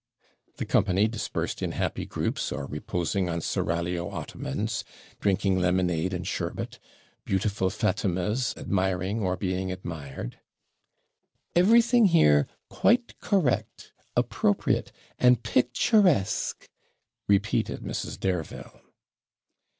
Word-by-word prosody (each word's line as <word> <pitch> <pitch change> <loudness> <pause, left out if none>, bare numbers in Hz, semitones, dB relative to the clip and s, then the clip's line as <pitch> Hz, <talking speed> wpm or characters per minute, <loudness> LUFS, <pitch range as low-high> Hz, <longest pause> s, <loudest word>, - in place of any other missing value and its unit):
The - - -3
company, 100 +2 +3
dispersed 110 0 -3
in - - -2
happy - - -2
groups, - - -2
or 70 - -3
reposing 85 +5 -2
on 85 0 -1
seraglio 85 +1 -1
ottomans, 110 +12 -4 0.4
drinking 95 -1 +2
lemonade 90 -1 +1
and 90 -1 -4
sherbet, - - -4 0.4
beautiful 95 -1 0
Fatimas 105 +4 0
admiring, 95 +2 -1
or 95 -3 0
being 95 -1 -2
admired 80 -9 -6 1.2
'Everything 230 +5 +5
here 75 - +5 0.2
quite 240 +2 +1
correct, 185 - 0 0.3
appropriate, - - +1 0.3
and 125 -2 +5
picturesque,' 130 - +2 0.6
repeated 100 0 +1
Mrs. - - -4
Dareville. 90 -5 -4
95 Hz, 95 wpm, -27 LUFS, 90-115 Hz, 1.2 s, Everything